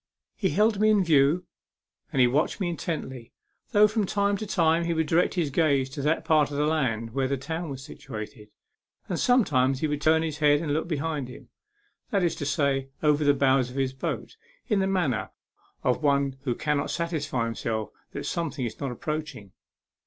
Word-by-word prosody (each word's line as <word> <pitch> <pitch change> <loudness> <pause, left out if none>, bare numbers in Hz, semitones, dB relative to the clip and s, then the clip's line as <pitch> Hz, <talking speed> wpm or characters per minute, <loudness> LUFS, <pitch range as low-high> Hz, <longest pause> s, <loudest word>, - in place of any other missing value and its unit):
He 190 - 0
held 210 +1 +2
me 215 +1 +4
in 210 -3 +4
view, 155 +2 +3 0.7
and 135 - -1
he 125 - +7
watched 140 - +1
me 185 -3 0
intently, 135 -8 -5 0.4
though 210 -2 +6
from 215 -2 -1
time 200 0 +1
to 215 +1 -5
time 165 -2 +2
he 170 0 0
would 160 0 +1
direct 165 +5 +2
his 165 -6 0
gaze 140 -4 +2
to 140 - -5
that 150 +3 0
part 155 -3 +3
of 145 - -5
the 150 - +2
land 115 -8 -1
where 135 0 0
the 140 +1 -1
town 160 +5 -4
was 135 -1 -7
situated, 110 -5 -9 0.6
and - - -2
sometimes 135 - +3
he 155 - +1
would 150 -1 -2
turn 160 +1 +3
his 155 -2 -4
head 145 -1 +4
and 150 -2 -2
look 160 +2 -1
behind 155 -4 -2
him 125 - -12 0.6
that 200 -3 +1
is 170 - +2
to 145 - -3
say, 140 -2 0
over 150 0 +3
the 145 -1 +4
bows 135 -2 +3
of 125 - -11
his 135 -1 0
boat, 135 - -5 0.3
in 210 -5 +2
the 190 - +1
manner 175 - 0 0.5
of 125 +3 +1
one 140 -2 +2
who 120 -3 0
cannot 150 -1 -1
satisfy 150 -8 -2
himself 110 -2 -3 0.2
that - - -6
something 155 -6 -2
is 115 - -6
not 140 -3 -3
approaching. 150 -6 -5
150 Hz, 195 wpm, -26 LUFS, 135-170 Hz, 0.7 s, he